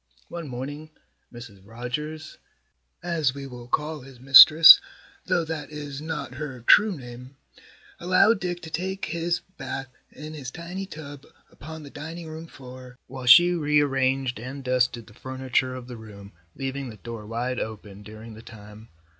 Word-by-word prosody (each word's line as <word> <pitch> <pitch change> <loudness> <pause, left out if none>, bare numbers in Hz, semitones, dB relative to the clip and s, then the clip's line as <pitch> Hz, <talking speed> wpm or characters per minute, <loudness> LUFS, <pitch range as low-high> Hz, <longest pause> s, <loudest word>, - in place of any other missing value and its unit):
One 170 -3 -7
morning, 140 +5 -7 0.4
Mrs. 115 -5 -12
Rogers 125 +9 -7 0.6
(as 160 -6 -1
we 140 -1 -7
will 125 -2 -10
call 150 +3 -2
his 130 -1 -15
mistress, 155 - +10 0.5
though 170 -2 +1
that 155 -3 -6
is 145 -2 -7
not 155 -5 -5
her 135 -2 -7
true 205 - +5
name), 125 +1 -12 0.6
allowed 185 +5 +3
Dick 175 -2 -4
to 160 - -9
take 190 +4 -3
his 170 +2 -2 0.2
bath 135 -1 -6 0.2
in 155 +1 -10
his 140 -5 -7
tiny 175 +6 -7
tub 145 -5 -11 0.2
upon 160 +1 -10
the 140 - -12
dining 165 +3 -8
room 160 +1 -9
floor, 125 -3 -13
while 130 -1 -9
she 175 +8 +8
rearranged 135 -5 0
and 130 +4 -8
dusted 125 -2 0
the 105 - -17
furniture 130 +1 -2
of 125 -1 -9
the 125 -2 -9
room, 100 -2 -12 0.2
leaving 135 0 -5
the 110 - -11
door 110 0 -9
wide 120 +3 -3
open 105 -2 -7
during 110 +2 -11
the 110 - -12
time. 105 0 -14
135 Hz, 155 wpm, -25 LUFS, 125-155 Hz, 0.6 s, mistress